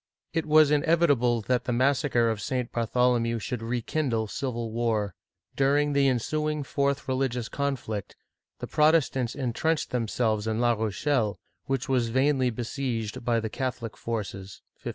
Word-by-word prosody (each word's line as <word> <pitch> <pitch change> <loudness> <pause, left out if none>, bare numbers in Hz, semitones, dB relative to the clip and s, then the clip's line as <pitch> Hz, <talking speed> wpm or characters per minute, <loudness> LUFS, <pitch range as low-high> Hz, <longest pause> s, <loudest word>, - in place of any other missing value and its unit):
It 165 -1 -1
was 155 -1 +6
inevitable 145 -7 +3
that 125 +3 0
the - - -1
massacre 125 -2 +2
of 110 -2 -4
St. 125 +2 -2
Bartholomew 120 0 +1
should 115 +2 -4
rekindle 120 +1 -1
civil 120 -3 -3
war. 110 -4 0 0.4
During 145 +2 +2
the 140 -1 +4
ensuing 150 +4 0
fourth 140 +1 -1
re 130 - 0
ligious 125 -3 -1
conflict, 125 -8 -3 0.4
the - - -5
Protestants 150 -6 +2
intrenched 145 +4 -1
themselves 110 -2 0
in 110 0 -1
La 120 0 +3
Rochelle, 110 +1 0 0.3
which 135 +1 -2
was 125 -4 +1
vainly 130 +1 +2
besieged 120 -2 -3
by 115 -1 +2
the 110 - -3
Catholic 120 -4 -4
forces 100 -4 -5 0.2
(1573). - - -4
125 Hz, 145 wpm, -27 LUFS, 115-140 Hz, 0.4 s, was